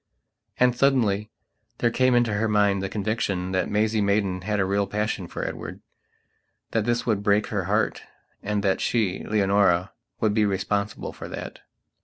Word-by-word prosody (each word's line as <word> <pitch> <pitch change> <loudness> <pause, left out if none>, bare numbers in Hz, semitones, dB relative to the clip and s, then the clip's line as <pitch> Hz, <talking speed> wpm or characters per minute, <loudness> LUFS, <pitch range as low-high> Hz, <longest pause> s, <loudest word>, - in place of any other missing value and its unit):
And, 125 -1 +4
suddenly, 115 -6 +2 0.5
there 120 - +1
came 130 +1 +3
into 120 -3 +2
her 105 +2 +1
mind 100 -2 +2
the 95 - -3
conviction 100 -3 -2
that 95 0 0
Maisie 110 +1 +1
Maidan 100 -2 +1
had 105 +2 -1
a 95 - +2
real 100 +1 0
passion 105 -3 -2
for - - -5
Edward; - - -6 0.9
that 110 -2 0
this 120 0 0
would 110 -4 +1
break 105 0 +2
her - - -2
heartand 105 0 -3
that 95 -1 +1
she, 105 -6 0
Leonora, 100 -3 +2 0.3
would 110 -2 +2
be 110 0 +3
responsible 100 +1 -1
for - - -8
that. - - -7
105 Hz, 160 wpm, -25 LUFS, 100-110 Hz, 0.9 s, And